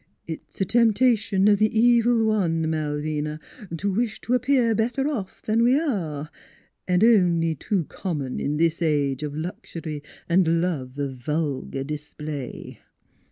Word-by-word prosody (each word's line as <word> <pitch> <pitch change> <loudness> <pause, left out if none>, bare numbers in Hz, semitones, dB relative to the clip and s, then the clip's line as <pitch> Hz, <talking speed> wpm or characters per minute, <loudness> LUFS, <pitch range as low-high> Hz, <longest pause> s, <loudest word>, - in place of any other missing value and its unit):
" - - -47
It's 160 -1 -9
a 195 - +2
temptation 225 -3 +3
of 205 -1 +5
the 215 +1 +2
Evil 235 -1 +4
One, 170 -7 +1
Malvina, 150 0 -2 0.4
to 200 +4 -1
wish 225 +1 -1
to 245 - -2
appear 250 -2 +3
better 245 +5 0
off 230 -11 -4
than 220 +1 +1
we 250 +4 +4
are, 165 - -3 0.6
an' 180 +2 +3
only 175 -7 +4
too 185 +5 -1
common 145 -9 -4
in 150 +1 -1
this 165 +1 +1
age 145 -4 +1
of 150 -1 -4
luxury 160 -2 -6 0.3
an' 170 -1 +3
love 145 -7 -2
of 140 -2 -3
vulgar 140 0 -2
dis 150 +1 -7
play." 150 -4 -6
170 Hz, 150 wpm, -24 LUFS, 150-220 Hz, 0.6 s, of